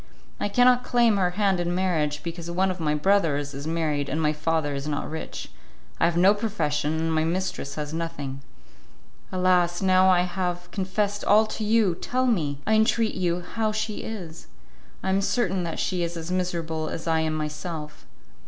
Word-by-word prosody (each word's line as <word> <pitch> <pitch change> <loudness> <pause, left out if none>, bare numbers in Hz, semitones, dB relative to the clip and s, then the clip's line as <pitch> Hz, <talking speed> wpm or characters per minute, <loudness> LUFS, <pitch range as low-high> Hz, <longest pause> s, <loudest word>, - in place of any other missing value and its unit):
I 205 - -1
cannot 245 +3 +4
claim 235 -4 +3
her 185 -2 +2
hand 195 -3 +2
in 175 0 -1
marriage, 155 -5 0
because 170 0 -5
one 185 +2 +1
of 180 - -6
my 150 -2 +1
brothers 150 -4 +1
is 140 +3 -6
married, 155 -3 -1
and 155 - -1
my 155 -1 +2
father 155 -1 0
is 140 +1 -4
not 145 -1 -2
rich; 160 - -6 0.5
I - - +4
have 170 0 +1
no 190 +3 +6
profession, 160 -8 -1
and 165 0 0
my 155 0 +2
mistress 175 -3 -2
has 150 0 -4
nothing. 145 -5 -4 0.9
Alas, 180 -2 +2
now 185 -1 +4
that - - +6
I 175 - +4
have 180 -1 -3
confessed 205 +1 -1
all 215 +2 +5
to 215 0 -5
you, 215 -3 +3
tell 255 +9 -1
me, 160 - +1
I 220 - +2
entreat 220 +1 +3
you, 175 -1 -1
how 215 +4 -2
she 215 0 -2
is. 175 -7 -7 0.6
I 190 - -1
am 195 +1 +2
certain 195 -3 0
that 165 - -4
she 180 -2 -1
is 170 0 -2
as 165 +2 -5
miserable 165 -3 -2
as 165 - -5
I 165 -1 +2
am 160 0 0
myself. 150 0 -5
175 Hz, 190 wpm, -25 LUFS, 155-195 Hz, 0.9 s, no